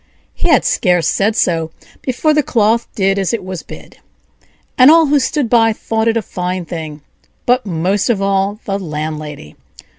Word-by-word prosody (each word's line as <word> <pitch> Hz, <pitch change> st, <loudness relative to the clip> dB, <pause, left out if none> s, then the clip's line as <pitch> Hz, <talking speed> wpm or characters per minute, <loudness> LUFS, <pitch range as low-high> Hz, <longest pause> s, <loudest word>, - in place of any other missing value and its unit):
He -, -, -2 dB
had 295 Hz, -, +4 dB
scarce 180 Hz, -2 st, +2 dB
said 210 Hz, +2 st, +1 dB
so 165 Hz, -6 st, 0 dB, 0.3 s
before 280 Hz, +4 st, 0 dB
the 300 Hz, -, +3 dB
cloth 230 Hz, -3 st, +1 dB
did 195 Hz, 0 st, +1 dB
as 195 Hz, +3 st, -1 dB
it 225 Hz, -5 st, -2 dB
was 185 Hz, -2 st, -6 dB
bid; -, -, -13 dB, 0.8 s
and 255 Hz, +2 st, +7 dB
all 325 Hz, +1 st, +6 dB
who 290 Hz, 0 st, +3 dB
stood 275 Hz, -1 st, -1 dB
by 225 Hz, -1 st, +3 dB
thought 220 Hz, +1 st, -2 dB
it 230 Hz, 0 st, +2 dB
a 225 Hz, -, -2 dB
fine 180 Hz, 0 st, -4 dB
thing, 155 Hz, -3 st, -7 dB, 0.4 s
but 245 Hz, -2 st, +1 dB
most 185 Hz, +4 st, 0 dB
of 225 Hz, -4 st, +1 dB
all 195 Hz, +1 st, 0 dB
the 195 Hz, 0 st, -2 dB
landlady. 150 Hz, -, -6 dB
200 Hz, 175 wpm, -16 LUFS, 175-235 Hz, 0.8 s, and